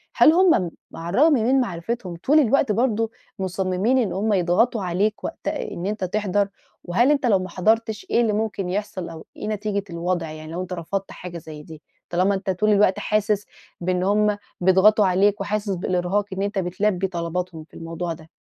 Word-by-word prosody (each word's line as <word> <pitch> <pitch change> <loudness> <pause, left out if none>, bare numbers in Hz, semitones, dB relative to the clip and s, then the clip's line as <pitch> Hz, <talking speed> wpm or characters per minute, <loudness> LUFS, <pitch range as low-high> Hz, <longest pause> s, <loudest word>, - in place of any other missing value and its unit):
هل 310 - +7
هُم 335 - +4 0.2
على 165 +1 -6
الرغَم 310 +3 +6
من 260 +1 +3
معرِفتهم، 185 -2 -4
طول 300 +3 +5
الوقت 275 -2 +3
برضه 225 0 +1 0.3
مصمِّمين 190 +5 0
إن 235 -6 +1
هُم 210 +3 0
يضغُطوا 195 +5 +2
عليك 195 +4 0
وقت - - -6
إن 170 - -3
أنتَ 205 0 -2
تحضَر؟ 200 +1 0 0.3
وهل 235 +10 +3
أنتَ 280 -3 +1
لو 205 -5 +4
ما 185 0 -5
حضَّرتِش، 215 +4 0
إيه 235 - +3
اللي 225 -3 +1
ممكن 205 -4 -2
يحصَل، 200 -1 -3
أو 160 -1 -10
إيه - - -5
نتيجة 210 -1 -2
الوضع 170 -1 -2
يعني، 155 0 -9
لو 175 +2 -3
أنتَ 185 0 -5
رفَضت 190 +3 -4
حاجة 175 -1 -8
زي 155 -2 -10
دي؟ 155 0 -12 0.3
طالما 185 +3 +2
أنتَ 195 0 -4
طول 190 +3 +1
الوقت 205 -2 +4
حاسس 210 -1 0 0.4
بأن 180 +1 0
هُم 210 +1 +2 0.2
بيضغطوا 190 +3 +5
عليك، 195 +3 +2
وحاسس 205 +1 -2
بالإرهاق 180 +3 0
إن 190 - -3
أنتَ 200 0 -1
بتلبِّي 190 +1 0
طلباتهم 170 -1 -4
في 155 - -26
الموضوع 165 +1 -4
ده. 160 0 -14
195 Hz, 180 wpm, -23 LUFS, 180-215 Hz, 0.4 s, هل